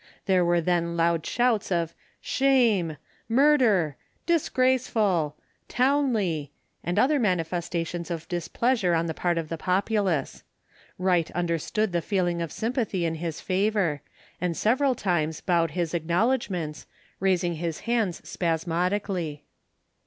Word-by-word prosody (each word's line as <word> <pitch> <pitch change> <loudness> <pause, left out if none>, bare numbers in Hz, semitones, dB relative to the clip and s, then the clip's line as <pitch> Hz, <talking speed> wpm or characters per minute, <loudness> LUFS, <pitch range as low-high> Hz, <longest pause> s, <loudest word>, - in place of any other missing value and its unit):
There 185 -2 +3
were 175 0 +2
then 170 0 0
loud 165 -1 +2
shouts 240 -4 +1
of 170 -2 0 0.3
"Shame," 230 - +2 0.3
"Murder," 230 - +3 0.3
"Disgraceful," 235 - +1 0.3
"Townley," 230 - +1 0.3
and 175 - -2
other 285 +3 +4
manifestations 175 -3 -1
of 165 -2 -5
displeasure 180 +2 0
on 165 0 +1
the 165 - -2
part 175 +1 0
of 165 -2 -2
the 165 - -4
populace. 190 -5 0 0.6
Wright 180 -3 +2
understood 175 +5 0
the 170 -1 0
feeling 175 -3 0
of 165 - -3
sympathy 225 -6 -1
in 165 - 0
his 165 -1 -4
favour, 190 -6 0 0.4
and 175 -2 -1
several 260 +4 +2
times 160 -7 -1
bowed 170 -3 +1
his 170 -2 -1
acknowledgments, 175 -1 -1 0.3
raising 180 -3 +1
his 165 -1 -3
hands 230 -7 -1
spasmodically. 170 -1 -1
180 Hz, 120 wpm, -26 LUFS, 165-220 Hz, 0.6 s, other